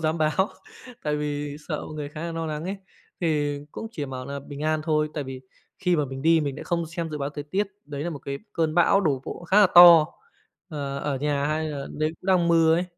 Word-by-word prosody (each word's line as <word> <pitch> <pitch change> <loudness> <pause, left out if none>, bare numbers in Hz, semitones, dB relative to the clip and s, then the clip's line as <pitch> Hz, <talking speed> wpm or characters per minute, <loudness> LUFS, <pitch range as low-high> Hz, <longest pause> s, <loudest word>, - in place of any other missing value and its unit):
dám 160 0 0
báo, 155 +6 +2 0.5
tại 150 -1 0
vì 145 -1 -3
sợ 150 - -3
mọi 155 - -8
người 150 -1 -4
khá 150 +1 -9
nà 170 0 -4
no 165 0 -3
nắng 155 +1 -4
ấy. 195 +2 -3 0.4
Thì 145 -3 0
cũng - - -6
chỉ 150 -7 -4
bảo 130 -1 -6
nà 140 0 -5
bình 140 +1 -9
an 155 0 +1
thôi, 155 -1 +1
tại 145 -3 -3
vì 130 -1 -7 0.4
khi 180 -2 +2
mà 150 - +1
mình 135 0 -7
đi 165 0 +5
mình 140 -2 -3
lại - - -7
không 170 -1 -1
xem 165 0 -4
dự 150 - -4
báo 140 +1 -2
thời 145 -1 -6
tiết, 195 +7 -1 0.2
đấy 145 0 -5
là 175 - -2
một 145 - -6
cái 140 0 -5
cơn 160 -1 0
bão 175 +3 +5
đổ 140 -8 0
bộ 175 - -7
khá 195 +5 +4
là 200 - +8
to, 170 -3 +10 0.6
ờ, 140 -3 -4
ở 140 -1 -2
nhà 145 0 0
hay 155 +1 -1
là 140 -2 -5
đấy 155 +1 -1
cũng 185 - -13
đang 180 -3 +3
mưa 165 -1 +5
ấy, 175 +2 +1
155 Hz, 255 wpm, -25 LUFS, 145-165 Hz, 0.6 s, to